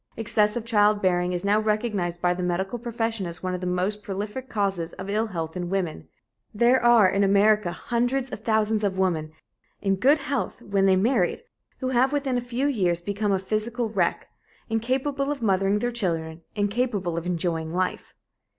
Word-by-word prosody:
Excessive 220 0 +1
childbearing 205 -5 +2
is 180 +1 -2
now 205 +1 +3
recognized 210 -5 -1
by 175 0 +3
the 180 - -5
medical 190 +6 -2
profession 225 -4 -2
as 170 +2 -8
one 185 0 -1
of 180 - -4
the 180 - -3
most 185 +4 -1
prolific 210 +6 -5
causes 195 -5 -1
of 195 +2 -6
ill 220 +2 +1
health 165 -5 -5
in 175 -1 -3
women. 175 - -2 0.5
There 240 +3 +4
are 240 -4 +6
in 195 +2 +1
America 200 -1 +3
hundreds 245 +6 -1
of - - -5
thousands 220 -1 +1
of 195 -2 0
women, 165 -5 0 0.5
in 195 -1 0
good 275 +9 +4
health 275 -2 -3
when 195 -1 +1
they 190 - +5
married, 205 - +1 0.4
who 255 - -1
have 260 +1 +3
within 275 -3 0
a 245 - +1
few 245 +2 -2
years 185 -11 +1
become 200 +2 -1
physical 215 +4 -2
wrecks, 185 -5 0 0.5
incapable 265 +5 0
of 275 -5 -4
mothering 195 0 +2
their 245 +3 -1
children, 165 -7 -2
incapable 205 -4 -1
of 170 +1 -3
enjoying 165 -2 -1
life. 185 +2 -2
205 Hz, 175 wpm, -25 LUFS, 180-235 Hz, 0.5 s, are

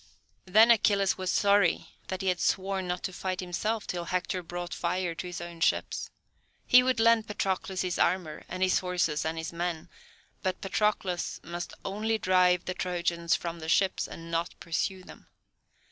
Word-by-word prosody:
Then 220 +5 +7
Achilles 200 -4 +3
was 185 -1 -2
sorry 200 -3 +3 0.2
that 190 +1 -4
he 190 - +2
had 180 -1 0
sworn 190 -1 0
not 180 0 -3
to 185 - -3
fight 185 0 -3
himself 210 +5 -2
till 175 -1 -3
Hector 180 +1 -1
brought 175 +1 -6
fire 175 0 -1
to 180 - -6
his 180 - -5
own 170 -1 -8
ships. - - 0 0.6
He 250 - +7
would 255 -1 +1
lend 225 -1 +4
Patroclus 190 -2 -2
his 180 -1 -2
armour, 175 -5 0
and 185 +1 -2
his 185 - +3
horses, 175 -5 0
and 160 +1 -2
his 160 +1 -5
men; 170 -1 -3 0.5
but 185 -1 -1
Patroclus 195 -3 -1
must 175 +1 -6
only 215 +3 -1
drive 180 -2 +3
the 185 - -2
Trojans 175 -2 0
from 170 -1 -5
the 160 0 -6
ships, 190 +2 +2
and 165 0 -9
not 165 +1 -2
pursue 185 +3 -2
them. - - -14
180 Hz, 175 wpm, -29 LUFS, 175-195 Hz, 0.6 s, Then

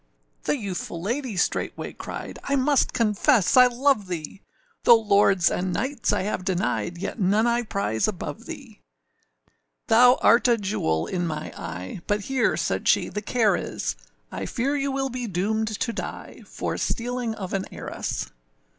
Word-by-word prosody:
The - - +1
youthful 190 -6 -5
lady 235 +3 -3
straightway - - -1
cried, - - -7
âI 280 - +1
must 280 0 +2
confess 220 - +3
I 250 -1 +9
love 250 -4 +1
thee, 175 +2 -6 0.4
Though 235 -1 +7
lords 200 -4 +4
and 180 +1 -1
knights 260 +8 -1
I 205 - 0
have 195 -2 -2
denied, 180 -2 -1
Yet 200 +6 -5
none 205 +3 +3
I 240 0 +2
prize 200 - -1
above 175 -8 -5
thee: - - -9 1.1
Thou 245 +3 +7
art 235 +2 +6
a 240 -1 +4
jewel 85 - -1
in 175 - -2
my 155 -2 -4
eye, 90 - -6
But 205 0 +1
here,â 260 +3 +1
said - - -1
she, - - +3
âthe 210 - -4
care 225 -4 +3
is,â - - -3 0.4
I - - -3
fear 270 +4 -1
you 275 -1 -1
will 270 0 -1
be 250 -1 -4
doomed 215 +4 0
to 220 +2 -2
die - - -7
For - - -4
stealing 245 -1 -2
of 190 -4 -6
an 195 -1 -1
heiress. - - -5
215 Hz, 165 wpm, -25 LUFS, 185-245 Hz, 1.1 s, I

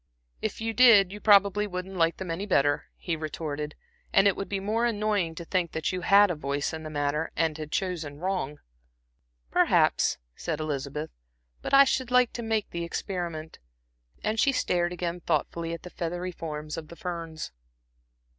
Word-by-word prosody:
"If - - -3
you 225 0 -2
did, 220 -6 +7
you 210 - -7
probably 205 0 +5
wouldn't 185 0 -5
like 165 -1 +2
them 185 -3 -4
any 190 +5 -3
better," 145 -6 +2
he 170 - -2
retorted. 150 -1 -4 0.4
"And 195 - +5
it 200 - +3
would 195 - -5
be 200 - -1
more 215 +4 0
annoying 210 -7 0
to 170 - -7
think 175 -1 -1
that 160 - -1
you 185 -1 -3
had 200 +3 +6
had 205 -3 +5
a - - -2
voice 140 0 -2
in 160 - -5
the 155 - -6
matter 150 +1 -1
and 165 -2 +1
had 155 -1 -7
chosen 165 -7 -2
wrong." 175 -4 -2 0.9
"Perhaps," - - +3 0.2
said 160 -3 -3
Elizabeth, 150 0 -3 0.5
"but - - -5
I 275 - +10
should 260 -2 0
like 250 -1 +4
to 235 - -4
make 220 -2 -1
the 170 0 -3
experiment." 170 -3 -4 0.6
And 215 +1 0
she 275 - +4
stared 175 -9 +1
again 175 0 -3
thoughtfully 165 0 -1
at 170 - -6
the 180 - -9
feathery 175 +2 -3
forms 155 -3 -6
of 160 -2 -6
the 170 - -11
ferns. 165 -3 -5
175 Hz, 185 wpm, -27 LUFS, 155-200 Hz, 0.9 s, I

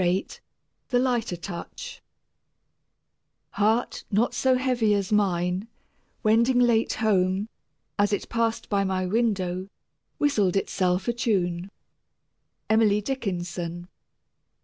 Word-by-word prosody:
VIII 180 +2 +1 0.6
THE 245 - +2
LIGHTER 245 -6 0
TOUCH 170 0 -8 1.5
Heart 220 +4 +1
not 220 +4 +1
so 260 -1 +2
heavy 245 -5 +2
as 200 -1 -2
mine, 185 -1 +1 0.6
Wending 235 +3 +4
late 235 -2 +3
home, 195 -2 +1 0.5
As 205 0 +3
it 205 - -1
passed 230 -1 -1
my 190 -2 +1
window 190 -3 0 0.5
Whistled 210 -11 +2
itself 185 -1 0
a 240 - +2
tune. 190 -7 -1 1.0
EMILY 215 -1 +3
DICKINSON. 175 -7 -4
205 Hz, 100 wpm, -26 LUFS, 185-230 Hz, 1.5 s, Wending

